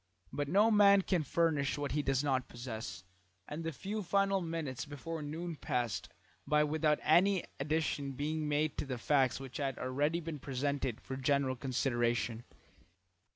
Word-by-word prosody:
But 145 Hz, -1 st, -1 dB
no 205 Hz, +8 st, +4 dB
man 200 Hz, -2 st, +6 dB
can 180 Hz, -3 st, +1 dB
furnish 150 Hz, -2 st, +1 dB
what 145 Hz, -1 st, -2 dB
he 150 Hz, -, +1 dB
does 135 Hz, -1 st, +1 dB
not 130 Hz, -3 st, 0 dB
possess, 115 Hz, -7 st, -6 dB, 0.4 s
and 150 Hz, +3 st, -5 dB
the 165 Hz, -, -2 dB
few 200 Hz, +8 st, -4 dB
final 195 Hz, +1 st, +2 dB
minutes 160 Hz, -6 st, -3 dB
before 155 Hz, +2 st, -6 dB
noon 165 Hz, +3 st, -4 dB
passed 115 Hz, -11 st, -2 dB, 0.4 s
by 150 Hz, +1 st, +4 dB
without 150 Hz, 0 st, +2 dB
any 180 Hz, +4 st, +4 dB, 0.2 s
addition 145 Hz, -1 st, -1 dB
being 150 Hz, +3 st, -2 dB
made 150 Hz, +1 st, 0 dB
to -, -, -1 dB
the 130 Hz, -2 st, -3 dB
facts 135 Hz, +1 st, +2 dB
which 135 Hz, -2 st, -7 dB
had 135 Hz, -3 st, -2 dB
already 145 Hz, +6 st, 0 dB
been 160 Hz, -3 st, -5 dB
presented 135 Hz, -2 st, -2 dB
for 130 Hz, -, -6 dB
general 135 Hz, -1 st, +1 dB
consideration. 120 Hz, -2 st, 0 dB
145 Hz, 155 wpm, -33 LUFS, 130-165 Hz, 0.4 s, man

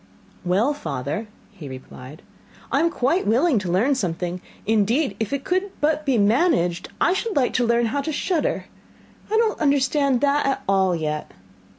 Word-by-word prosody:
'Well, 200 Hz, +11 st, +2 dB
father,' 155 Hz, -, -4 dB, 0.2 s
he 170 Hz, -9 st, -10 dB
replied, 130 Hz, +2 st, -11 dB, 0.5 s
'I 275 Hz, -, +2 dB
am 335 Hz, +2 st, +3 dB
quite 330 Hz, +4 st, 0 dB
willing 250 Hz, +4 st, +3 dB
to 185 Hz, -3 st, -3 dB
learn 225 Hz, +11 st, +3 dB
something 180 Hz, -6 st, -3 dB, 0.2 s
indeed, 225 Hz, +7 st, +1 dB
if 220 Hz, -2 st, -2 dB
it 280 Hz, -1 st, -2 dB
could 370 Hz, +5 st, 0 dB
but 300 Hz, 0 st, 0 dB
be 265 Hz, -3 st, +3 dB
managed, 205 Hz, -, +2 dB
I 355 Hz, -, +3 dB
should 430 Hz, +1 st, -2 dB
like 265 Hz, -4 st, +2 dB
to 245 Hz, -2 st, +1 dB
learn 235 Hz, 0 st, +3 dB
how 275 Hz, +5 st, -1 dB
to 315 Hz, -, -3 dB
shudder. 315 Hz, +2 st, -1 dB, 0.7 s
I 440 Hz, -, +3 dB
don't 450 Hz, -1 st, +1 dB
understand 280 Hz, -2 st, +2 dB
that 285 Hz, 0 st, +2 dB
at 270 Hz, -, -1 dB
all 190 Hz, -2 st, +2 dB
yet. 150 Hz, -2 st, -3 dB
250 Hz, 170 wpm, -23 LUFS, 190-295 Hz, 0.7 s, am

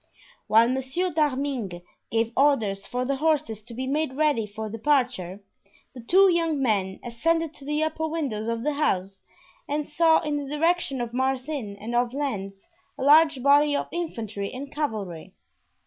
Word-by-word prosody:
While 225 Hz, +2 st, +5 dB
Monsieur 265 Hz, +8 st, -1 dB
d'Arminges 270 Hz, -, -1 dB, 0.3 s
gave 230 Hz, 0 st, 0 dB
orders 225 Hz, -9 st, +2 dB
for 250 Hz, +1 st, -2 dB
the 275 Hz, +1 st, -1 dB
horses 300 Hz, -7 st, 0 dB
to 235 Hz, -, -10 dB
be 260 Hz, +2 st, -3 dB
made 290 Hz, +1 st, -1 dB
ready 285 Hz, -6 st, +1 dB
for 215 Hz, +1 st, -6 dB
departure, 225 Hz, -5 st, 0 dB, 0.5 s
the 250 Hz, -, -9 dB
two 375 Hz, +11 st, +5 dB
young 330 Hz, -4 st, +1 dB
men 200 Hz, -7 st, 0 dB
ascended 325 Hz, +7 st, 0 dB
to 275 Hz, -, -13 dB
the 300 Hz, +2 st, 0 dB
upper 320 Hz, 0 st, -1 dB
windows 275 Hz, -10 st, -3 dB
of 230 Hz, 0 st, -2 dB
the 300 Hz, +1 st, 0 dB
house 195 Hz, -10 st, -1 dB, 0.5 s
and 295 Hz, +1 st, -1 dB
saw 320 Hz, +1 st, +4 dB
in 300 Hz, -2 st, -2 dB
the 285 Hz, -1 st, -5 dB
direction 330 Hz, -5 st, +1 dB
of 235 Hz, -1 st, -4 dB
Marsin 260 Hz, -4 st, -2 dB
and 225 Hz, +4 st, -6 dB
of 240 Hz, +1 st, +1 dB
Lens 195 Hz, -9 st, -4 dB, 0.3 s
a -, -, -4 dB
large 300 Hz, -2 st, +5 dB
body 290 Hz, +1 st, +5 dB
of -, -, -2 dB
infantry 220 Hz, -, -4 dB
and 275 Hz, +2 st, -7 dB
cavalry. 210 Hz, -, -4 dB
265 Hz, 165 wpm, -25 LUFS, 225-300 Hz, 0.5 s, While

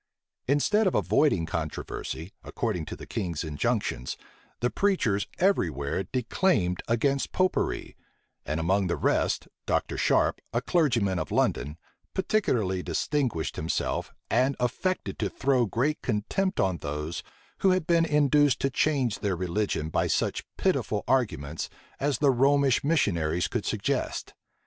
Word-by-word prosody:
Instead 195 Hz, -, +3 dB
of 185 Hz, -, +1 dB
avoiding 140 Hz, -, +3 dB
controversy, 80 Hz, +2 st, -4 dB
according 80 Hz, -3 st, -2 dB
to -, -, -6 dB
the -, -, -10 dB
king's 90 Hz, -9 st, -3 dB
injunctions, 75 Hz, -4 st, -1 dB, 0.4 s
the 120 Hz, -, 0 dB
preachers 145 Hz, -, +1 dB
every 190 Hz, -, +3 dB
where 70 Hz, +6 st, -3 dB
declaimed 120 Hz, -, +1 dB
against 135 Hz, +4 st, +1 dB
Popery; 185 Hz, 0 st, 0 dB, 0.5 s
and 75 Hz, +2 st, -2 dB
among 95 Hz, +4 st, +2 dB
the 85 Hz, -, 0 dB
rest, -, -, +1 dB, 0.2 s
Dr. -, -, 0 dB
Sharpe, -, -, +2 dB
a 120 Hz, -, +2 dB
clergyman 120 Hz, -, +1 dB
of -, -, -3 dB
London, 75 Hz, +3 st, 0 dB, 0.4 s
particularly 120 Hz, -, +1 dB
distinguished 125 Hz, -, -1 dB
himself, 80 Hz, +2 st, -2 dB, 0.2 s
and 130 Hz, +4 st, +2 dB
affected 155 Hz, +10 st, -1 dB
to -, -, 0 dB
throw 130 Hz, -4 st, +1 dB
great 140 Hz, +9 st, 0 dB
contempt 160 Hz, -, -1 dB
on 95 Hz, -3 st, +2 dB
those 75 Hz, +2 st, -4 dB, 0.4 s
who 195 Hz, -, +4 dB
had 185 Hz, -3 st, +2 dB
been 170 Hz, -1 st, +3 dB
induced 145 Hz, -2 st, +3 dB
to 135 Hz, -, +1 dB
change 130 Hz, -6 st, +1 dB
their 100 Hz, -3 st, 0 dB
religion 90 Hz, -2 st, -1 dB
by -, -, +1 dB
such -, -, 0 dB
pitiful -, -, 0 dB
arguments 80 Hz, -, 0 dB, 0.3 s
as 140 Hz, -2 st, +1 dB
the 140 Hz, 0 st, +4 dB
Romish 135 Hz, +1 st, +3 dB
missionaries 85 Hz, -, +1 dB
could -, -, -3 dB
suggest. -, -, -2 dB
120 Hz, 135 wpm, -27 LUFS, 85-145 Hz, 0.5 s, who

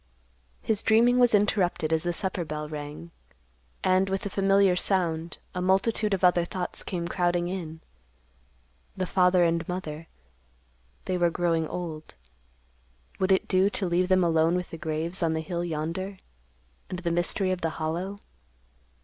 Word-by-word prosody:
His 215 Hz, -2 st, 0 dB
dreaming 235 Hz, +3 st, +4 dB
was 245 Hz, -3 st, +5 dB
interrupted 185 Hz, -6 st, +1 dB
as 160 Hz, -, +2 dB
the 175 Hz, -, -1 dB
supper 185 Hz, 0 st, -2 dB
bell 150 Hz, -1 st, -5 dB
rang, 150 Hz, +2 st, -7 dB, 0.7 s
and, 185 Hz, +1 st, +3 dB
with 195 Hz, 0 st, -1 dB
the 200 Hz, -, -4 dB
familiar 195 Hz, -1 st, +3 dB
sound, 170 Hz, -4 st, 0 dB, 0.2 s
a 180 Hz, -, -3 dB
multitude 195 Hz, +3 st, +2 dB
of 185 Hz, -, -8 dB
other 180 Hz, -1 st, +5 dB
thoughts 180 Hz, +1 st, -4 dB
came 170 Hz, -2 st, -3 dB
crowding 175 Hz, 0 st, 0 dB
in; 165 Hz, -4 st, -6 dB, 1.2 s
the 185 Hz, -, -1 dB
father 180 Hz, -1 st, +3 dB
and 170 Hz, 0 st, +1 dB
mother—they -, -, -8 dB
were 175 Hz, -1 st, +4 dB
growing 165 Hz, -2 st, 0 dB
old. 160 Hz, -, -6 dB, 1.0 s
Would 190 Hz, 0 st, +1 dB
it 190 Hz, -, +3 dB
do 190 Hz, +2 st, +3 dB
to 205 Hz, -, -2 dB
leave 180 Hz, +1 st, +1 dB
them 185 Hz, -1 st, +3 dB
alone 165 Hz, 0 st, +3 dB
with 180 Hz, -1 st, -3 dB
the 165 Hz, -, -6 dB
graves 160 Hz, +4 st, -3 dB
on 165 Hz, -1 st, +1 dB
the 160 Hz, -, -1 dB
hill 170 Hz, +2 st, -3 dB
yonder, 170 Hz, +4 st, -3 dB, 0.7 s
and 180 Hz, -, -4 dB
the 175 Hz, -1 st, -2 dB
mystery 175 Hz, +3 st, +1 dB
of 185 Hz, -1 st, -2 dB
the 165 Hz, -, 0 dB
Hollow? 170 Hz, +5 st, -3 dB
175 Hz, 155 wpm, -27 LUFS, 160-190 Hz, 1.2 s, was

